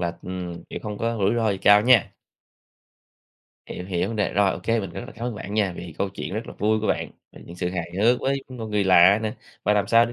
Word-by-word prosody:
là, 85 Hz, -1 st, -2 dB
ừm, 90 Hz, -2 st, -6 dB
chuyện -, -, -6 dB
không 105 Hz, -1 st, -5 dB
có 115 Hz, 0 st, -1 dB
rủi 100 Hz, +2 st, +2 dB
ro 115 Hz, -2 st, +1 dB
gì 95 Hz, -, -2 dB
cao 105 Hz, +2 st, +6 dB
nha. 120 Hz, -1 st, +4 dB, 1.5 s
Hiểu, 90 Hz, -, -7 dB
hiểu 90 Hz, 0 st, -1 dB
vấn 115 Hz, -, -4 dB
đề. 105 Hz, -, 0 dB
Rồi, 100 Hz, -1 st, +3 dB
ô -, -, -6 dB
kê, 115 Hz, 0 st, +1 dB
mình 95 Hz, -3 st, -6 dB
rất -, -, -7 dB
là -, -, -11 dB
cảm 115 Hz, -, -7 dB
ơn 120 Hz, -, -3 dB
bạn 100 Hz, 0 st, -7 dB
nha, 105 Hz, -4 st, +1 dB
vì 85 Hz, -3 st, -8 dB
câu 100 Hz, -, 0 dB
chuyện 95 Hz, 0 st, -6 dB
rất 110 Hz, +2 st, -4 dB
là -, -, -8 dB
vui 110 Hz, +1 st, +1 dB
của 110 Hz, -, -2 dB
bạn, -, -, -1 dB, 0.2 s
những 85 Hz, -, -12 dB
sự 90 Hz, 0 st, -2 dB
hài 85 Hz, -2 st, -4 dB
hước 120 Hz, +4 st, +3 dB
với 135 Hz, 0 st, -1 dB
một 125 Hz, -4 st, -7 dB
người 105 Hz, -2 st, 0 dB
lạ 95 Hz, +2 st, +6 dB
nè, 110 Hz, -1 st, -2 dB, 0.3 s
và 105 Hz, -, +3 dB
làm 100 Hz, -1 st, +1 dB
sao 115 Hz, +2 st, +5 dB
để 120 Hz, -, -7 dB
105 Hz, 265 wpm, -24 LUFS, 95-115 Hz, 1.5 s, cao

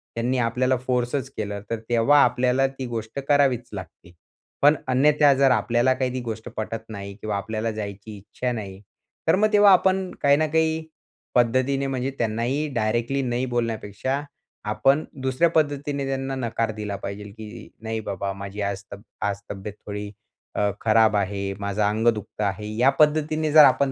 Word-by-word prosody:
त्यांनी 120 Hz, +3 st, 0 dB
आपल्याला 125 Hz, +2 st, +1 dB
फोर्सच 125 Hz, +1 st, -1 dB
केला 105 Hz, -1 st, -3 dB
तर 115 Hz, -, -2 dB
तेव्हा 120 Hz, +5 st, +4 dB
आपल्याला 125 Hz, +2 st, +2 dB
ती 135 Hz, -1 st, -7 dB
गोष्ट 115 Hz, +1 st, -5 dB
करावीच 135 Hz, -5 st, +2 dB
लागते. 90 Hz, -2 st, -9 dB, 0.5 s
पण 145 Hz, +2 st, +6 dB
अन्यथा 145 Hz, +2 st, +4 dB
जर 135 Hz, 0 st, +4 dB
आपल्याला 120 Hz, +2 st, +2 dB
काही 130 Hz, -1 st, -2 dB
ती 130 Hz, -, -2 dB
गोष्ट 115 Hz, 0 st, -6 dB
पटत 110 Hz, +1 st, -3 dB
नाही 100 Hz, -2 st, -7 dB
किंवा 105 Hz, 0 st, -3 dB
आपल्याला 110 Hz, +2 st, -3 dB
जायची 105 Hz, 0 st, -7 dB
इच्छा 125 Hz, +5 st, -4 dB
नाही. 100 Hz, -5 st, -6 dB, 0.5 s
तर -, -, +5 dB
मग 215 Hz, +2 st, +2 dB
तेव्हा 205 Hz, -1 st, +7 dB
आपण 190 Hz, 0 st, +2 dB
काही 140 Hz, 0 st, +5 dB
ना 155 Hz, +1 st, +1 dB
काही 160 Hz, +1 st, +1 dB, 0.5 s
पद्धतीने 130 Hz, +3 st, +2 dB
म्हणजे 130 Hz, 0 st, -2 dB
त्यांनाही 120 Hz, +6 st, -1 dB
डायरेक्टली 120 Hz, +4 st, 0 dB
नाही 125 Hz, 0 st, -1 dB
बोलण्यापेक्षा 120 Hz, +1 st, -2 dB, 0.5 s
आपण 135 Hz, +8 st, +3 dB, 0.2 s
दुसऱ्या 130 Hz, +6 st, +2 dB
पद्धतीने 145 Hz, -3 st, 0 dB
त्यांना 135 Hz, 0 st, -2 dB
नकार 115 Hz, -3 st, -1 dB
दिला 105 Hz, -2 st, -4 dB
पाहिजेल 100 Hz, +1 st, -6 dB
की 110 Hz, +1 st, -10 dB
"नाही 110 Hz, 0 st, -3 dB
बाबा 100 Hz, 0 st, -2 dB
माझी 100 Hz, +1 st, -7 dB
आज 100 Hz, 0 st, -2 dB
तब्य 100 Hz, 0 st, -9 dB, 0.2 s
आज 100 Hz, -1 st, -2 dB
तब्येत 100 Hz, +1 st, -6 dB
थोडी 105 Hz, 0 st, -5 dB, 0.4 s
अ, 105 Hz, -, +2 dB
खराब 110 Hz, -1 st, +4 dB
आहे. 100 Hz, 0 st, -1 dB
माझं 100 Hz, +1 st, -2 dB
अंग 110 Hz, +3 st, +1 dB
दुखतं 105 Hz, -2 st, 0 dB
आहे." 100 Hz, +1 st, -2 dB
या 125 Hz, +3 st, +5 dB
पद्धतीने 155 Hz, 0 st, +2 dB
जर 155 Hz, 0 st, +9 dB
आपण 140 Hz, -1 st, +4 dB
120 Hz, 165 wpm, -24 LUFS, 105-135 Hz, 0.5 s, जर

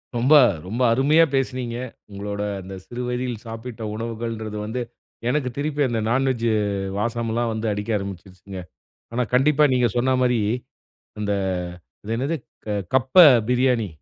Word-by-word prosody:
ரொம்ப, 125 Hz, +6 st, +3 dB, 0.3 s
ரொம்ப 115 Hz, +6 st, -3 dB
அருமையா 145 Hz, +6 st, +5 dB
பேசினீங்க. 125 Hz, -3 st, -1 dB, 0.3 s
உங்களுடைய 100 Hz, +1 st, -4 dB
அந்த 95 Hz, +1 st, -9 dB
சிறு 120 Hz, 0 st, -6 dB
வயதில் 125 Hz, -2 st, -3 dB
சாப்பிட்ட 115 Hz, +1 st, -7 dB
உணவுகள்ங்கறது 115 Hz, -1 st, -4 dB
வந்து 120 Hz, +4 st, -3 dB, 0.5 s
எனக்கு 130 Hz, -1 st, 0 dB
திருப்பி 145 Hz, 0 st, -1 dB
அந்த 115 Hz, -2 st, -1 dB
நான் 135 Hz, +3 st, +2 dB
வெஜ் 120 Hz, -3 st, -1 dB, 0.5 s
வாசம்லாம் 115 Hz, +1 st, -1 dB
வந்து 110 Hz, +1 st, -3 dB
அடிக்க 105 Hz, +2 st, -4 dB
ஆரம்பிச்சுடுச்சுங்க. 95 Hz, 0 st, -8 dB, 0.5 s
ஆனா, 125 Hz, +1 st, +1 dB
கண்டிப்பா 150 Hz, +4 st, +4 dB
நீங்க 125 Hz, -1 st, +3 dB
சொன்ன 130 Hz, +2 st, +2 dB
மாதிரி 125 Hz, -2 st, +3 dB, 0.8 s
அந்த 105 Hz, -1 st, 0 dB, 0.7 s
இது 110 Hz, +2 st, -3 dB
என்னது 140 Hz, +7 st, -1 dB, 0.6 s
கப்ப 130 Hz, 0 st, +1 dB, 0.3 s
பிரியாணி. 125 Hz, -3 st, +2 dB
120 Hz, 130 wpm, -23 LUFS, 110-130 Hz, 0.8 s, அருமையா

